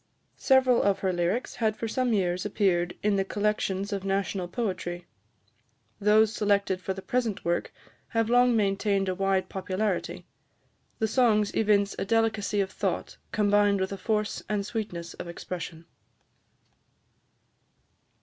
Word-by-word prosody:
Several 260 Hz, -3 st, +4 dB
of 195 Hz, -1 st, +1 dB
her 190 Hz, -1 st, +1 dB
lyrics 175 Hz, +8 st, -1 dB
had 220 Hz, -2 st, 0 dB
for 230 Hz, -, -3 dB
some 250 Hz, +2 st, 0 dB
years 180 Hz, -4 st, 0 dB
appeared 185 Hz, -4 st, +1 dB
in 205 Hz, -1 st, +2 dB
the 195 Hz, -, +2 dB
collections 200 Hz, 0 st, -1 dB
of 195 Hz, -1 st, -3 dB
national 195 Hz, -1 st, -1 dB
poetry. 180 Hz, -4 st, -3 dB, 0.9 s
Those 215 Hz, +1 st, +4 dB
selected 200 Hz, -3 st, +1 dB
for 190 Hz, +2 st, -3 dB
the 190 Hz, -, -8 dB
present 240 Hz, -5 st, -1 dB
work 170 Hz, 0 st, 0 dB, 0.4 s
have 225 Hz, -2 st, 0 dB
long 245 Hz, 0 st, +4 dB
maintained 200 Hz, -1 st, +1 dB
a -, -, 0 dB
wide 195 Hz, 0 st, 0 dB
popularity. 185 Hz, -2 st, -2 dB, 0.7 s
The 220 Hz, -, 0 dB
songs 215 Hz, -3 st, +2 dB
evince 205 Hz, -2 st, +2 dB
a -, -, -1 dB
delicacy 220 Hz, -1 st, +1 dB
of 190 Hz, -1 st, -2 dB
thought, -, -, -3 dB
combined 205 Hz, -1 st, +3 dB
with 190 Hz, +1 st, -1 dB
a -, -, -2 dB
force 215 Hz, 0 st, -1 dB
and 205 Hz, -1 st, -1 dB
sweetness 180 Hz, -7 st, -5 dB
of -, -, -8 dB
expression. 170 Hz, -1 st, -7 dB
200 Hz, 140 wpm, -27 LUFS, 190-215 Hz, 0.9 s, Several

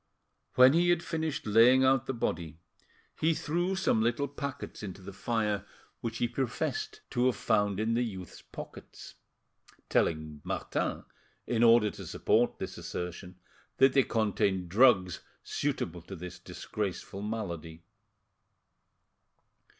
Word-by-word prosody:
When 130 Hz, +2 st, +8 dB
he 175 Hz, +2 st, +3 dB
had 175 Hz, -1 st, +2 dB
finished 160 Hz, -4 st, -3 dB
laying 115 Hz, +5 st, +6 dB
out 130 Hz, 0 st, +3 dB
the 135 Hz, -, -1 dB
body, 80 Hz, -7 st, -3 dB, 0.6 s
he 160 Hz, +1 st, +2 dB
threw 175 Hz, +6 st, -1 dB
some 185 Hz, -, +2 dB
little 120 Hz, +5 st, +1 dB
packets 140 Hz, 0 st, -6 dB
into 100 Hz, -2 st, -7 dB
the 95 Hz, +1 st, -9 dB
fire 105 Hz, -2 st, -1 dB, 0.4 s
which 115 Hz, -1 st, -4 dB
he 120 Hz, -, +1 dB
professed 135 Hz, -, -3 dB
to 125 Hz, 0 st, +2 dB
have 130 Hz, -, +2 dB
found 105 Hz, -3 st, +1 dB
in 110 Hz, +1 st, +1 dB
the 120 Hz, -, +2 dB
youth's 95 Hz, -7 st, -6 dB
pockets, -, -, -10 dB, 0.8 s
telling 80 Hz, -2 st, 0 dB
Martin, -, -, -2 dB, 0.4 s
in 115 Hz, -2 st, 0 dB
order 115 Hz, -3 st, +6 dB
to -, -, -9 dB
support -, -, +1 dB
this -, -, -6 dB
assertion, 90 Hz, +1 st, -6 dB, 0.4 s
that 135 Hz, 0 st, +5 dB
they 135 Hz, -, +6 dB
contained 100 Hz, -6 st, 0 dB
drugs 95 Hz, -4 st, +4 dB, 0.2 s
suitable 85 Hz, +1 st, -2 dB
to 95 Hz, +4 st, -9 dB
this 90 Hz, 0 st, -8 dB
disgraceful 100 Hz, -1 st, -5 dB
malady. 85 Hz, -7 st, -5 dB
115 Hz, 130 wpm, -30 LUFS, 95-130 Hz, 0.8 s, When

